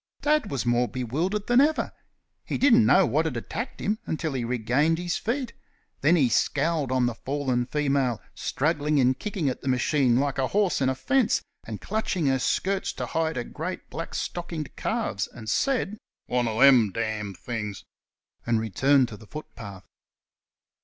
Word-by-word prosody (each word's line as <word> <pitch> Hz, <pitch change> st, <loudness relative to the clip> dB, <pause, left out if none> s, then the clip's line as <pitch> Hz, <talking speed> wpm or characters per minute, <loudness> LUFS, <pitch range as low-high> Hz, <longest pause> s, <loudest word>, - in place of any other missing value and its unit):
Dad 300 Hz, -7 st, +2 dB
was 135 Hz, -7 st, -2 dB
more 120 Hz, 0 st, +2 dB
bewildered 155 Hz, -, -2 dB
than 245 Hz, +2 st, +5 dB
ever. 305 Hz, +2 st, +1 dB, 0.5 s
He -, -, -3 dB
didn't 240 Hz, -5 st, +5 dB
know 190 Hz, -, +6 dB
what 155 Hz, +3 st, +1 dB
had 145 Hz, -7 st, -2 dB
attacked 230 Hz, -, -5 dB
him 215 Hz, +2 st, -1 dB
until 160 Hz, -1 st, -2 dB
he 130 Hz, -2 st, -2 dB
regained 125 Hz, +7 st, +1 dB
his 175 Hz, 0 st, -2 dB
feet; 245 Hz, +2 st, -2 dB, 0.5 s
then 155 Hz, +5 st, +5 dB
he 145 Hz, -7 st, +4 dB
scowled 145 Hz, +3 st, +1 dB
on 130 Hz, -1 st, +2 dB
the 120 Hz, -, 0 dB
fallen 130 Hz, 0 st, -2 dB
female, 135 Hz, -6 st, 0 dB
struggling 150 Hz, 0 st, 0 dB
and 130 Hz, 0 st, +3 dB
kicking 195 Hz, -7 st, -2 dB
at 130 Hz, -, -2 dB
the -, -, -7 dB
machine 125 Hz, -1 st, +2 dB
like 140 Hz, 0 st, -1 dB
a 130 Hz, -, +2 dB
horse 200 Hz, -4 st, +1 dB
in 130 Hz, -, +3 dB
a 130 Hz, -, 0 dB
fence, 220 Hz, -, +1 dB, 0.2 s
and 110 Hz, -2 st, -6 dB
clutching 195 Hz, -6 st, -1 dB
her 135 Hz, -1 st, +2 dB
skirts 190 Hz, +8 st, 0 dB
to -, -, -4 dB
hide 160 Hz, 0 st, -1 dB
her 120 Hz, -, -2 dB
great, 160 Hz, +9 st, -6 dB
black 165 Hz, -, -5 dB
stockinged 170 Hz, -3 st, -4 dB
calves, 220 Hz, -, -2 dB
and 115 Hz, -2 st, -12 dB
said 230 Hz, -6 st, 0 dB, 0.3 s
"One 125 Hz, -1 st, 0 dB
o' 110 Hz, 0 st, -2 dB
them 130 Hz, -6 st, +7 dB
damn 105 Hz, -2 st, -3 dB
things!" 105 Hz, +2 st, -5 dB, 0.6 s
and 115 Hz, -1 st, +1 dB
returned 130 Hz, +5 st, +3 dB
to 105 Hz, -, -9 dB
the 110 Hz, -, -15 dB
footpath. 100 Hz, -10 st, -9 dB
140 Hz, 175 wpm, -26 LUFS, 120-175 Hz, 0.6 s, them